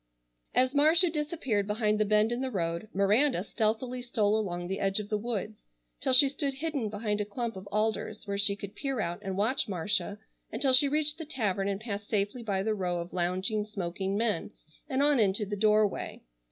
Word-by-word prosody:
As 255 +2 +3
Marcia 320 +4 +5
disappeared 295 -10 -1
behind 210 0 0
the 215 - +3
bend 215 +2 +3
in 240 +1 -2
the 265 - -1
road, 170 -2 -2
Miranda 200 +2 +2
stealthily 230 +4 -1
stole 215 -4 +1
along 175 -5 -2
the 190 +2 -3
edge 195 +1 +1
of 210 -1 -6
the 210 - 0
woods, 215 -2 -5 0.3
till 260 - +1
she 260 +2 +9
stood 280 0 -2
hidden 280 -6 -2
behind 210 0 -2
a - - +1
clump 230 +2 -4
of 190 +1 -9
alders 215 +1 -1
where 200 -1 -3
she 200 0 +3
could 200 0 -9
peer 270 -3 -3
out 175 -2 -2
and 190 -2 -4
watch 230 +7 +1
Marcia 200 +2 -1 0.3
until 260 +3 +1
she 270 +3 +7
reached 300 +1 0
the 320 - -5
tavern 205 -9 -1
and 200 0 -2
passed 205 -2 -5
safely 210 +3 -1
by 200 -4 -1
the 220 +1 0
row 180 -4 -2
of 170 +1 -7
lounging, 185 +4 -1
smoking 195 -1 -3
men, 215 -6 0 0.4
and 270 +1 +1
on 290 -3 +4
into 205 0 +2
the 205 +1 -4
doorway. 210 0 +1
215 Hz, 200 wpm, -29 LUFS, 200-250 Hz, 0.4 s, she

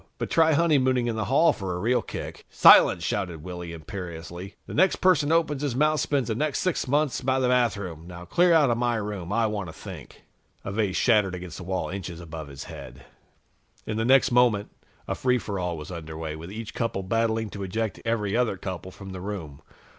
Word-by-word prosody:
But - - -4
try 160 -1 +4
honeymooning 135 -6 +3
in 115 -2 -1
the 110 -1 -2
hall 150 +4 +4
for 95 -3 -4
a - - -4
real 120 +5 +2
kick." - - -7
"Silence!" 85 - +7
shouted 85 -4 -2
Willy 90 -1 -6
imperiously. 85 +1 -8
"The - - -8
next 190 +4 +4
person 180 -6 +3
who 165 - +4
opens 150 -4 +1
his 140 -5 -1
mouth 155 +2 +2
spends 140 -3 0
the 115 - 0
next 150 +5 -1
sixth 185 -7 -1
months 145 +1 +1
by 130 0 +1
the 130 - +2
bathroom. 100 -10 0
Now 90 0 -9
clear 175 - +3
out 150 -6 +5
of 115 - 0
my 120 -1 +1
room. 105 -4 -4
I 115 +2 +2
want 105 -5 -3
to - - -9
think." - - -11 0.4
A 95 - -3
vase 100 -2 0
shattered 105 -6 +3
against 90 -2 -8
the - - -8
wall, 95 +1 -2
inches 90 -3 -6
above 80 -2 -8
his 70 -1 -8
head. 65 -1 -10 0.8
In 110 - -3
the 110 - 0
next 130 +2 +4
moment, 120 -4 +3 0.4
a - - -1
free 125 -1 +1
for 100 -5 -4
all 90 -2 -2
was 75 +3 -8
under 80 -2 -7
way, 80 -1 -4
with 85 +4 -9
each 110 +1 -7
couple 115 -5 -2
battling 110 +1 0
to 100 - -7
eject 105 +2 -3
every 110 -3 -1
other 120 -5 +1
couple 95 -1 -6
from 95 +1 -10
the 95 -1 -7
room. 90 -8 -6
105 Hz, 215 wpm, -26 LUFS, 90-125 Hz, 0.8 s, Silence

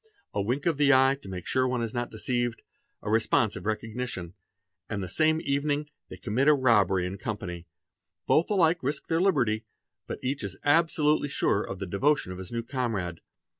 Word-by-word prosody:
A 100 - 0
wink 125 +8 -1
of 165 -4 +2
the 145 -1 +5
eye 135 0 +5
to 95 - -10
make 90 -2 -6
sure 130 0 +1
one 125 -2 -1
is 115 - -4
not 120 -1 -2
deceived, 120 +2 -2 0.4
a 105 - -2
response 110 -1 +2
of - - -7
recognition—and 100 -4 -6
the - - -4
same 155 - +2
evening 145 +1 -1 0.2
they 95 - -9
commit 110 +9 0
a 150 - +7
robbery 105 -8 +3
in 95 +2 -5
company; 90 -6 -5 0.6
both 160 - +3
alike 175 -4 +3
risk 140 +2 -3
their 165 +1 +2
liberty, 120 - +1 0.4
but - - -4
each 135 0 -2
is 95 -2 -5
absolutely 150 -1 +3
sure 105 -6 +1
of 95 - -6
the 95 - -4
devotion 100 +4 +1
of 90 - -7
his 95 -1 -8
new 115 0 -2
comrade. 115 - -3
120 Hz, 185 wpm, -27 LUFS, 100-145 Hz, 0.6 s, a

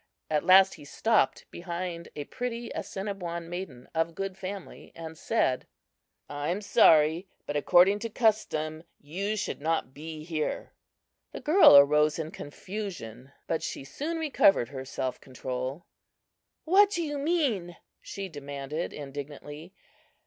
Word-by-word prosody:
At 150 -1 +2
last 190 +1 +7
he 160 -5 -12
stopped 220 +10 +1
behind 170 0 -5
a 145 - -4
pretty 240 - -5
Assiniboine 180 -4 -5
maiden 170 -8 -7
of 165 0 0
good 195 -1 -4
family 190 0 -8
and 160 -1 -8
said: 155 - 0 0.6
"I 145 0 -4
am 180 +4 0
sorry, 165 -3 +5 0.2
but, 145 - -4
according 180 +7 +5
to 230 +1 -4
custom, 160 -9 0 0.2
you 195 +9 -3
should 210 - -3
not 160 -4 -1
be 155 +1 -8
here." 155 -2 -3 0.6
The - - -5
girl 310 - +8
arose 150 +2 +5
in 160 -1 -4
confusion, 145 - -7
but 165 - -1
she - - -5
soon 300 - -4
recovered 270 - +3
her 130 -2 -7
self 130 -1 -4
control. 130 +4 -5 0.8
"What 390 +5 +6
do 345 -4 -1
you 295 -2 -3
mean?" 270 - 0 0.2
she 195 -1 -6
demanded, 145 0 -5
indignantly. 145 +3 -8
170 Hz, 135 wpm, -28 LUFS, 145-200 Hz, 0.8 s, girl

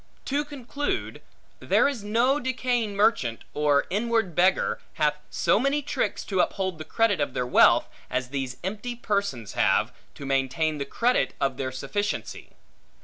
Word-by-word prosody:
To 285 +2 0
conclude, 290 +6 -4 0.4
there - - +3
is 265 -7 -3
no 235 +7 +2
decaying 245 -4 -1
merchant, 200 - +1
or 145 -1 +2
inward 225 -2 0
beggar, 180 +3 +2
hath 150 -1 +1
so - - +2
many 275 +3 +1
tricks 220 - -2
to 190 -2 -2
uphold 190 -3 0
the - - -4
credit 205 +2 +1
of 140 -2 -2
their 125 - 0
wealth, 125 - +5 0.2
as 125 0 -2
these 130 -2 -4
empty 215 +6 -4
persons 200 - -2
have, - - +2 0.2
to 140 - -8
maintain 135 +3 0
the 140 - -2
credit 235 - +1
of 135 -2 0
their 130 -1 -3
sufficiency. 205 +10 -3
200 Hz, 150 wpm, -26 LUFS, -, 0.4 s, wealth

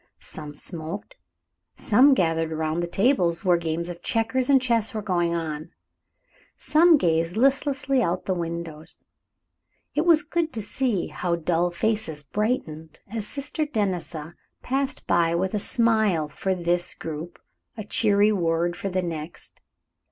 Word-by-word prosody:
Some 150 -1 -8
smoked, 170 +5 -4 0.6
some 265 +6 +5
gathered 165 -4 0
around 160 +1 -1
the 175 - -1
tables 180 -4 +1
where 180 -1 +5
games 170 0 -2
of 175 -1 -7
checkers 230 +5 0
and 275 -1 +6
chess 235 -2 +1
were 215 - -2
going 175 -3 0
on; 160 -1 -4 0.9
some 325 +2 +5
gazed 165 - 0
listlessly 275 +1 +2
out 180 -4 0
of - - -34
the 190 - 0
windows. 170 -2 -6 0.9
It 300 - +1
was 315 -3 +6
good 330 +1 -1
to 225 - -4
see 225 -4 -1
how 175 -1 -1
dull 170 +1 0
faces 175 -5 -1
brightened, 160 - -3
as 220 -2 -4
Sister 290 +2 -3
Denisa 180 - -3 0.3
passed 270 +2 -2
by 170 -1 +2
with 185 +3 -1
a 210 - 0
smile 220 -8 +3
for 190 +5 -2
this 175 0 -1
group, 160 +2 -7 0.4
a 215 - -4
cheery 205 -1 +3
word 175 -2 0
for 195 - -4
the 185 0 -1
next. 165 -1 -7
180 Hz, 145 wpm, -25 LUFS, 165-230 Hz, 0.9 s, and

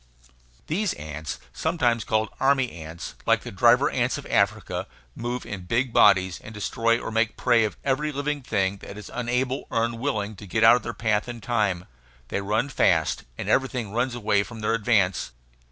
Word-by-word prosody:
These 195 +6 0
ants, 75 0 -6
sometimes 125 -9 +1
called 110 0 0
army 135 -2 +3
ants, 80 0 -8
like - - +4
the - - -8
driver - - +5
ants - - 0
of - - -8
Africa, - - 0 0.3
move 120 +1 -4
in 95 -3 -6
big 115 +5 0
bodies 95 -3 +4
and 110 - -10
destroy 115 +3 +1
or - - -5
make 115 +1 0
prey 120 -3 +3
of 105 - -4
every 145 +3 0
living 145 0 -2
thing 100 -5 0
that 100 - -10
is 105 - -9
unable 125 +2 -1
or 115 - +1
unwilling 115 -3 -2
to 100 - -10
get 110 +4 0
out 115 +2 +9
of 125 - -1
their 115 - -5
path 110 0 0
in 120 -1 -6
time. 105 -7 0 0.4
They 100 - -1
run 105 +6 0
fast, 80 - +2
and - - -5
everything 125 -5 0
runs 120 +3 0
away 105 -3 +2
from 115 +2 -8
their 105 - +1
advance. 105 - +1
115 Hz, 185 wpm, -25 LUFS, 100-125 Hz, 0.4 s, out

